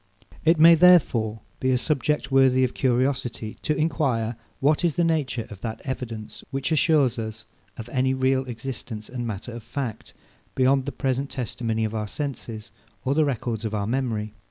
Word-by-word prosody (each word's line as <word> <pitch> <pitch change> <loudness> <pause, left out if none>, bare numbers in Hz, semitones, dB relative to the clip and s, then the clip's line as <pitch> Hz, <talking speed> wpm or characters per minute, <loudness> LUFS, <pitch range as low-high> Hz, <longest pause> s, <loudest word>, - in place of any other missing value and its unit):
It 165 +1 +4
may, 165 +2 +9
therefore, 140 -11 +4 0.2
be 130 - 0
a 130 - +3
subject 150 +1 0
worthy 130 -1 +5
of 125 - 0
curiosity, 125 -3 0
to 150 - 0
enquire 135 -8 0 0.2
what 150 +5 +2
is 170 -4 +2
the 175 - +2
nature 145 -8 0
of 100 - -10
that 110 -1 -4
evidence 115 -5 -5
which 135 +4 -2
assures 150 -6 +3
us 110 0 -6 0.3
of 115 - -7
any 130 +1 +1
real 130 0 +2
existence 120 -3 -6
and 120 -1 -4
matter 110 +2 -5
of 120 0 -7
fact, 115 0 -5 0.4
beyond 130 +1 +3
the - - -1
present 135 0 -1
testimony 115 -2 -2
of 110 - -4
our 105 -1 -2
senses, 115 -4 -5 0.3
or 130 - +2
the 155 +1 +3
records 120 -5 -2
of 110 -1 -2
our 100 -1 -1
memory. 110 -3 -2
130 Hz, 175 wpm, -25 LUFS, 115-140 Hz, 0.4 s, may